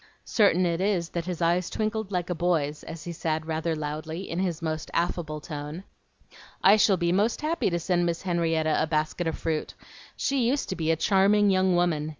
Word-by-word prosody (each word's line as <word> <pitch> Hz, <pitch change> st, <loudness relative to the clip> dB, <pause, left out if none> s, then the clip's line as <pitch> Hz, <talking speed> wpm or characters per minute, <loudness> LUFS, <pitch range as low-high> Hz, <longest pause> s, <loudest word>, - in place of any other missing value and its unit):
Certain 195 Hz, -5 st, +3 dB
it 170 Hz, 0 st, 0 dB
is 190 Hz, -4 st, 0 dB
that 170 Hz, -1 st, -4 dB
his 180 Hz, -2 st, -2 dB
eyes 175 Hz, +1 st, +2 dB
twinkled 215 Hz, -1 st, -2 dB
like 180 Hz, -1 st, -2 dB
a -, -, +2 dB
boy's, 160 Hz, -4 st, 0 dB
as 165 Hz, -, -8 dB
he 175 Hz, -, -5 dB
said 160 Hz, -1 st, -2 dB
rather 160 Hz, 0 st, -1 dB
loudly, 155 Hz, +4 st, -5 dB
in 170 Hz, -, -3 dB
his 175 Hz, -4 st, -1 dB
most 160 Hz, -2 st, -3 dB
affable 170 Hz, -3 st, -1 dB
tone, 150 Hz, +3 st, -7 dB, 0.8 s
"I 195 Hz, +2 st, +8 dB
shall 205 Hz, -2 st, +4 dB
be 170 Hz, -1 st, +1 dB
most 210 Hz, +8 st, +1 dB
happy 315 Hz, -4 st, 0 dB
to 170 Hz, -, 0 dB
send 175 Hz, 0 st, +1 dB
Miss 170 Hz, -1 st, -2 dB
Henrietta 165 Hz, -3 st, +1 dB
a 160 Hz, -, +1 dB
basket 155 Hz, +2 st, -1 dB
of 160 Hz, -, -2 dB
fruit. 160 Hz, -2 st, -3 dB, 0.4 s
She 265 Hz, -4 st, 0 dB
used 280 Hz, +4 st, 0 dB
to 190 Hz, -, -2 dB
be 160 Hz, -2 st, -2 dB
a 165 Hz, -, +4 dB
charming 200 Hz, +3 st, +3 dB
young 185 Hz, -1 st, +3 dB
woman. 165 Hz, -4 st, +1 dB
170 Hz, 200 wpm, -26 LUFS, 160-190 Hz, 0.8 s, I